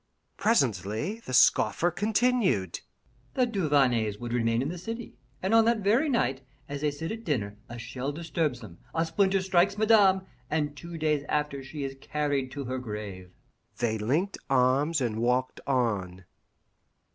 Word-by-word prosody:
Presently 135 - 0
the 230 - -9
scoffer 165 +6 +4
continued: 210 - +1 0.6
"The 255 - +3
Duvarneys 140 - +2
would 120 -1 -5
remain 115 0 +1
in 140 - -2
the 175 +1 -5
city, 225 +5 -7 0.2
and 190 +4 +1
on 225 0 +7
that 230 -1 +2
very 235 +10 +3
night, 135 - +1 0.3
as 140 0 -5
they 150 - +2
sit 160 +3 -5
at 225 +1 -6
dinner, 105 - -2
a 120 - -7
shell 125 +4 -4
disturbs 155 -4 -2
them, 90 -7 -11 0.2
a 165 +1 +2
splinter 195 +3 +2
strikes 190 +2 +2
Madame, 205 -3 +5 0.3
and 150 -1 -1
two 170 +3 -8
days 150 -2 +1
after 150 -2 -1
she 140 +2 -6
is 135 0 -4
carried 145 -3 -1
to 140 - -5
her 130 0 -3
grave." 105 -6 -7 0.5
They 110 -2 0
linked 150 - 0
arms 135 +4 +3
and 115 -3 -1
walked 125 +2 0
on. 100 -9 -1
145 Hz, 155 wpm, -28 LUFS, 120-190 Hz, 0.6 s, on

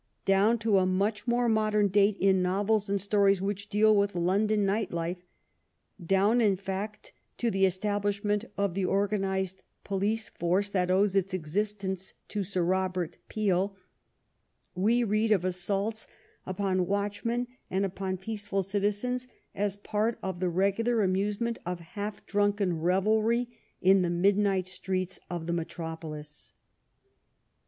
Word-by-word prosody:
Down 200 +4 +4
to 215 -3 +3
a 185 - +2
much 205 +4 0
more 240 0 +2
modem 215 -2 +2
date 200 +1 +3
in 190 -1 +4
novels 200 +3 +1
and 200 0 +1
stories 200 0 +3
which 200 +1 -3
deal 215 +1 +4
with 200 -1 +1
London 200 +4 +2
night 205 +3 0
life 175 +2 -4 0.4
— - - -48
down, 195 +7 +3
in 205 -4 +4
fact, 200 +2 -5 0.2
to 235 -1 0
the 195 0 +3
establishment 205 +2 0
of 200 -3 0
the 195 +1 -1
organ 200 +2 +1
ized 190 -1 -2 0.2
police 205 +3 -1
force 190 +4 0
which 180 -2 +1
owes 195 +1 +3
its 195 -1 +1
existence 190 +2 -3
to 205 -1 -2
Sir 185 -1 -1
Robert 185 -1 -1
Peel 195 -2 0 0.5
— - - -47
^we 230 +6 +2
read 215 +2 +1
of 190 -4 +3
assaults 195 +4 -1 0.4
upon 185 -1 0
watchmen 205 +4 -1 0.2
and 195 +1 +1
upon 190 0 -3
peaceful 205 0 -3
citizens 210 +6 -1 0.3
as 200 0 -1
part 215 +3 -1
of 190 -2 -3
the 180 -1 +1
regular 200 +6 +1
amusement 205 +5 0
of 180 0 -4
half 205 +5 -6
drunken 205 -4 +1
revelry 215 +7 +2 0.3
in 190 +1 +6
the 175 - +1
midnight 195 +1 +2
streets 185 -1 -3
of 175 -2 -4
the 170 - -1
metropolis. 160 -3 -6
195 Hz, 145 wpm, -29 LUFS, 185-210 Hz, 0.5 s, in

